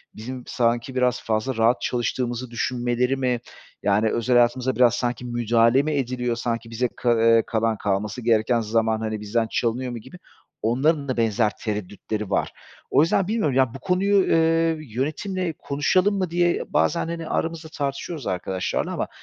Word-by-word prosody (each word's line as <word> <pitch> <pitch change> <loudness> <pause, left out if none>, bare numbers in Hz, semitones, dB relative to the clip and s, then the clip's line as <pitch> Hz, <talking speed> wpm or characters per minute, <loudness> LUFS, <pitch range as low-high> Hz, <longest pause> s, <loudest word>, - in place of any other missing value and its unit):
bizim 125 +3 -7
sanki 120 +1 0
biraz 125 -1 +1
fazla 110 +4 -1
rahat 115 +2 +3
çalıştığımızı 120 0 -2
düşünmeleri 120 +2 0
mi 125 -2 0 0.4
yani 105 +2 +2
özel 120 +3 0
hayatımıza 120 +2 +3
biraz 120 -2 +5
sanki 125 0 -2
müdahale 120 +1 +3
mi 155 - -1
ediliyor 125 -4 -1
sanki 115 -1 -3
bize 120 +2 0
ka 120 -2 +2
eee, 115 0 +5
kalan 115 -1 0
kalması 105 +4 -2
gereken 115 0 +2
zaman, 110 0 +1
hani, 110 -1 -3
bizden 115 +2 0
çalınıyor 125 +2 -1
mu 120 - -5
gibi 180 +11 -13 0.4
onların 140 +6 +1
da 130 - -2
benzer 110 -1 +2
tereddütleri 105 0 -4
var. - - 0 0.4
O - - +5
yüzden 180 +4 +2
bilmiyorum, 210 - 0
yani, 130 -3 +3
"Bu 135 - -8
konuyu, 195 +3 +2
eee, 165 0 +3 0.2
yönetimle 170 - -2
konuşalım 185 +8 +1
mı?" 185 -3 -1
diye 175 0 +1
bazen 170 - +2
hani, 165 -1 -5
aramızda 165 -1 -2
tartışıyoruz 140 0 -4
arkadaşlarla 95 0 -2
ama - - -2
125 Hz, 160 wpm, -23 LUFS, 115-145 Hz, 0.4 s, biraz